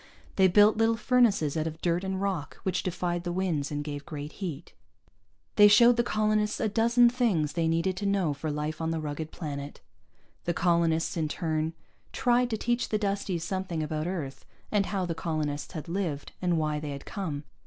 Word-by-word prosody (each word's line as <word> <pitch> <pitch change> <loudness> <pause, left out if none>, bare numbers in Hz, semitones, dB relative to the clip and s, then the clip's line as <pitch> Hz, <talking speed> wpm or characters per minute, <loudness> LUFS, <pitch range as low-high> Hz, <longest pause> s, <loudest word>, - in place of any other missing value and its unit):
They 190 -1 +5
built 210 +4 +5
little 225 0 +3
furnaces 225 - +3
out 160 0 0
of 160 0 -6
dirt 175 +1 0
and 190 0 -2
rock 190 -7 -3
which 190 - 0
defied 175 -1 -2
the 175 - -2
winds 175 -6 -1
and 145 0 -3
gave 145 -1 -5
great 145 -1 -7
heat. 180 -8 -6 0.8
They 205 - +9
showed 235 +3 +7
the 240 - +3
colonists 215 -2 +1
a - - +1
dozen 235 +3 +4
things 225 - +1
they 165 -1 0
needed 165 +3 +1
to 200 - -2
know 190 -6 +1
for 145 +3 -4
life 150 +2 -3
on 160 - -1
the 165 0 -1
rugged 155 +1 -4
planet. 145 -3 -6 0.7
The 175 - 0
colonists 170 -1 +1
in 160 -2 0
turn 160 0 -2 0.4
tried 245 0 +2
to 220 - -1
teach 240 +2 -1
the 215 - +1
Dusties 200 -4 -2
something 180 -2 -2
about 155 +1 -2
Earth, 155 -7 -4 0.3
and 205 -2 +2
how 195 -2 -1
the 170 - -2
colonists 155 -3 -3
had 155 -2 -6
lived, 170 -5 -3
and 175 -2 +1
why 150 -1 0
they 150 0 -5
had 140 -1 -6
come. 160 -8 -4
175 Hz, 195 wpm, -28 LUFS, 155-200 Hz, 0.8 s, They